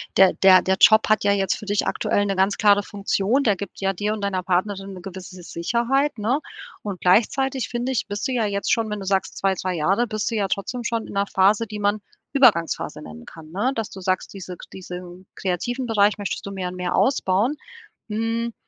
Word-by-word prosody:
der 190 -1 +7
der 190 -1 +6
der 190 0 +1
Job 220 0 +6
hat 215 -1 +2
ja 200 - +4
jetzt 195 -2 +1
für - - -10
dich 205 0 0
aktuell 205 - 0
'ne 195 -1 -2
ganz 195 +2 +2
klare 205 -1 +5
Funktion. 205 +6 0
Der 205 -4 +2
gibt 200 +1 -8
ja 195 0 +1
dir 205 +3 -2
und 215 - -5
deiner 195 -2 -1
Partnerin 195 +2 -1
'ne 185 - -9
gewisse 185 0 -9
S 175 - -11
Sicherheit, 235 +10 0
ne? 235 +7 0 0.4
Und 200 -4 -6
gleichzeitig 260 +7 +2
finde 245 +2 -3
ich, 250 - -1
bist 205 0 -4
du 265 - -3
ja 235 -3 +1
jetzt 200 -1 -1
schon, 225 -1 +1
wenn 210 -1 -3
du 195 - -6
sagst: 195 0 -1
„2, 195 -1 +1
2 185 0 -3
Jahre“, 195 +9 +1
bist 215 +1 -2
du - - -2
ja 200 -2 0
trotzdem 235 +6 -3
schon 230 -2 -1
in - - -10
'ner 200 0 0
Phase, 200 +4 +3
die 210 0 -6
man 205 +1 +1 0.3
Übergangsphase 230 - +2
nennen 80 0 -11
kann, 160 -1 -13
ne? 225 +9 0
Dass 225 -2 -3
du 195 - -10
sagst, 185 0 -2
diese 185 -2 -8
kr - - -13
diesen 180 0 -9
kreativen 240 +8 -2
Bereich 210 -1 +3
möchtest 205 -2 -4
du 200 - -6
jetzt 195 - -8
mehr 185 -1 -3
und 180 - -8
mehr 180 -1 -2
ausbauen. 240 +1 +1 0.5
Hm. 225 +2 -2
200 Hz, 230 wpm, -23 LUFS, 190-225 Hz, 0.5 s, der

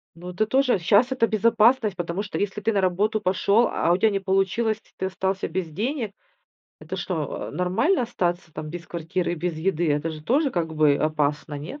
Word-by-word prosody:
Ну 175 +2 -8
это 185 +5 0
тоже. 260 -1 +2
Щас 210 +9 +3
это 240 -3 +2
безопасность, 220 0 +3
потому 175 +2 -3
что, 205 - -5
если 205 +1 -2
ты 225 +2 +1
на 200 - +2
работу 200 +4 +1
пошел, 200 +4 +2
а 170 - +1
у - - +4
тебя 220 +4 +3
не 200 -1 -1
получилось, 195 +3 +1
и - - -29
ты 190 - -2
остался 190 +1 -2
без 185 -3 -3
денег, 220 - -3 0.7
это - - -6
что, - - -3
а, - - -7
нормально 185 - +1
остаться, 175 -8 -2
там, 155 0 -6
без 170 +1 -7
квартиры 170 +1 -2
и - - -1
без 175 +1 -3
еды. 170 -1 0
Это 145 +3 0
же 155 -1 -8
тоже 275 - +2
как 165 -6 -2
бы 150 -2 +4
опасно. 150 0 -1
Нет? 165 - -8
190 Hz, 210 wpm, -24 LUFS, 170-220 Hz, 0.7 s, у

